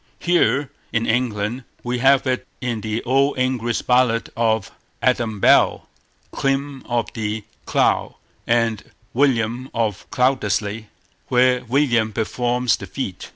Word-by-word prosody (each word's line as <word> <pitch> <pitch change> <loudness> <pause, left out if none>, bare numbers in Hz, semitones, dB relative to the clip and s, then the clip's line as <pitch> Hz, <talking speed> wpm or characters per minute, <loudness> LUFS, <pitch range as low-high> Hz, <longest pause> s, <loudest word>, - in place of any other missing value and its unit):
Here 145 -6 +1 0.2
in 115 0 0
England, 115 0 -1 0.2
we 125 0 -2
have 135 +2 +4
it 130 -1 -1
in 120 -4 -3
the 110 +1 -3
old 135 +3 +2
English 125 -2 0
ballad 125 -2 +2
of 110 -3 0 0.3
Adam 115 -4 0
Bell, - - +4 0.5
Clym 135 0 -1
of 120 -2 -1
the 110 -1 -3 0.2
Clough, - - +1 0.3
and 115 -3 +1 0.3
William 125 -1 +1
of 110 -4 -2
Cloudesly, 110 -5 0 0.4
where 125 0 +3
William 120 -4 +2
performs 120 +3 0
the 100 - -8
feat. 95 -1 -5
120 Hz, 120 wpm, -21 LUFS, 110-130 Hz, 0.5 s, have